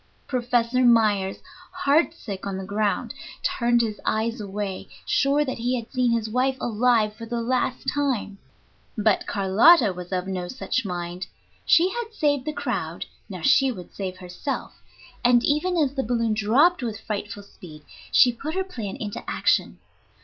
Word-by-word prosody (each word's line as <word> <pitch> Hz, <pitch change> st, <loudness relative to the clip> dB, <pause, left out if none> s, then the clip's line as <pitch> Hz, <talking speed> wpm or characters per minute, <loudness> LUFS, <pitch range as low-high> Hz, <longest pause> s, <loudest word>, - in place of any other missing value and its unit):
Professor 245 Hz, -1 st, +1 dB
Myers, 215 Hz, -5 st, +3 dB, 0.3 s
heart 310 Hz, +4 st, +2 dB
sick 200 Hz, -, -7 dB
on 195 Hz, -1 st, -3 dB
the 190 Hz, -, -5 dB
ground, 205 Hz, +1 st, -1 dB, 0.3 s
turned 240 Hz, 0 st, +2 dB
his 215 Hz, -3 st, -3 dB
eyes 225 Hz, +1 st, -1 dB
away, 200 Hz, -1 st, -5 dB, 0.2 s
sure 285 Hz, +1 st, +2 dB
that 260 Hz, -3 st, -4 dB
he 245 Hz, +2 st, 0 dB
had 230 Hz, -, -11 dB
seen 250 Hz, -2 st, +1 dB
his 230 Hz, -2 st, 0 dB
wife 255 Hz, +4 st, 0 dB
alive 225 Hz, -2 st, +2 dB
for 230 Hz, +1 st, -9 dB
the 235 Hz, 0 st, -2 dB
last 255 Hz, +2 st, -1 dB
time. 255 Hz, -9 st, -1 dB, 0.6 s
But 215 Hz, -1 st, +2 dB
Carlotta 205 Hz, -, +5 dB
was 180 Hz, 0 st, -9 dB
of 180 Hz, -1 st, -1 dB
no 185 Hz, -2 st, -3 dB
such 255 Hz, +1 st, -2 dB
mind. 175 Hz, 0 st, -4 dB, 0.4 s
She 350 Hz, +3 st, +5 dB
had 460 Hz, -1 st, -5 dB
saved 285 Hz, -6 st, +1 dB
the 305 Hz, -, -1 dB
crowd, 245 Hz, -, -3 dB, 0.2 s
now 185 Hz, -4 st, -7 dB
she 270 Hz, +5 st, +4 dB
would 180 Hz, -7 st, -10 dB
save 185 Hz, -2 st, -5 dB
herself; 185 Hz, +10 st, -6 dB, 0.4 s
and 240 Hz, 0 st, +5 dB
even 325 Hz, +5 st, +1 dB
as 285 Hz, -4 st, +2 dB
the 270 Hz, -, -1 dB
balloon 230 Hz, -2 st, 0 dB
dropped 255 Hz, -, +3 dB
with 225 Hz, -4 st, -4 dB
frightful 205 Hz, -1 st, -5 dB
speed, 155 Hz, -6 st, -13 dB, 0.3 s
she 245 Hz, -2 st, +6 dB
put 305 Hz, +7 st, -5 dB
her 380 Hz, -, 0 dB
plan 230 Hz, -, -6 dB
into 205 Hz, -2 st, -6 dB
action. -, -, +1 dB
230 Hz, 165 wpm, -24 LUFS, 200-265 Hz, 0.6 s, she